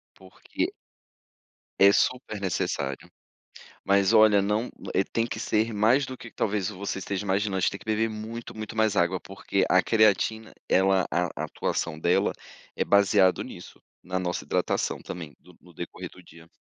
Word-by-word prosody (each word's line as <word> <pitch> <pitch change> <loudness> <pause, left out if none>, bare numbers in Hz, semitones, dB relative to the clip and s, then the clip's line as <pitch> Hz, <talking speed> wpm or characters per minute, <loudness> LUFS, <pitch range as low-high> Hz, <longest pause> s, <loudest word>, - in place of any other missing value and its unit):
Porque 95 -1 -5 1.1
é 100 +1 +8
super 125 -5 0
necessário. 90 -5 -2 0.7
Mas 100 +2 +3
olha, 110 -2 +6
não, 105 +4 0 0.2
eh, 95 - +3
tem 115 +3 -1
que - - -5
ser 110 +1 0
mais 115 +7 +3
do 130 -1 -8
que 115 - -11
talvez 100 -1 -1
você 95 -1 -4
esteja 100 +2 -4
imaginando, 100 0 0
a - - 0
gente - - +2
tem 100 - -7
que - - -16
beber 110 +1 +1
muito, 110 +2 -7
muito 110 0 -6
mais 110 -2 +2
água 90 +1 +2
porque 95 0 -2
a 95 - +5
creatina 110 0 +2 0.2
ela 95 0 +3
a 90 +1 +1 0.2
atuação 80 -2 -3
dela 85 +2 +2 0.4
é - - 0
baseado 100 -2 +4
nisso, - - -11 0.2
na 90 +1 -3
nossa 90 -1 -3
hidratação - - -1
também, 80 -5 -8
no - - -19
no - - -18
decorrer - - -7
do 90 - -16
dia. 85 -1 -16
100 Hz, 165 wpm, -26 LUFS, 95-110 Hz, 1.1 s, é